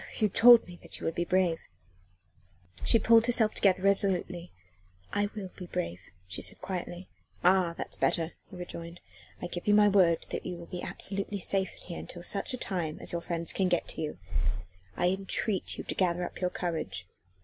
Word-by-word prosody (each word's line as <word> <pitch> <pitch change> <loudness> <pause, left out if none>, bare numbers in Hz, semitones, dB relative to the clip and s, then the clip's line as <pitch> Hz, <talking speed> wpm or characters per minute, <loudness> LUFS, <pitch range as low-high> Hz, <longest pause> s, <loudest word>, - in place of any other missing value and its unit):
"You 215 -2 +2
told 240 +4 +7
me 175 -1 -11
that - - -10
you - - -6
would 165 - 0
be 175 - -1
brave." 180 -2 +2 1.2
She - - +5
pulled 230 +1 +5
herself 230 -3 +4
together 190 -2 +3
resolutely. 185 -3 +2 0.6
"I 205 0 +1
will 195 -4 -6
be 180 - -8
brave," 85 - -3 0.3
she 90 - -6
said - - +2
quietly. 180 -1 -5 0.4
"Ah! 180 -2 +4
that's - - -2
better," 165 0 +1 0.2
he 195 - -11
rejoined. 170 -1 -7 0.4
"I - - -1
give 175 +1 -6
you 205 - +6
my 210 0 +6
word 180 -4 +4
that - - -3
you 180 - -4
will 170 - -9
be 175 +1 -6
absolutely 200 +1 -3
safe 190 +1 0
in - - -18
here 170 - -7
until 175 - -9
such 205 +8 -1
time 170 -8 -2
as - - 0
your 170 - -2
friends 170 -1 -3
can 190 -2 +1
get 175 - +1
to - - -4
you. 150 -8 -4 0.8
I 175 - +3
entreat 195 +1 -1
you - - -5
to - - -4
gather 180 -1 +1
up - - -8
your 180 - +2
courage. 155 - -3
180 Hz, 195 wpm, -30 LUFS, 170-195 Hz, 1.2 s, told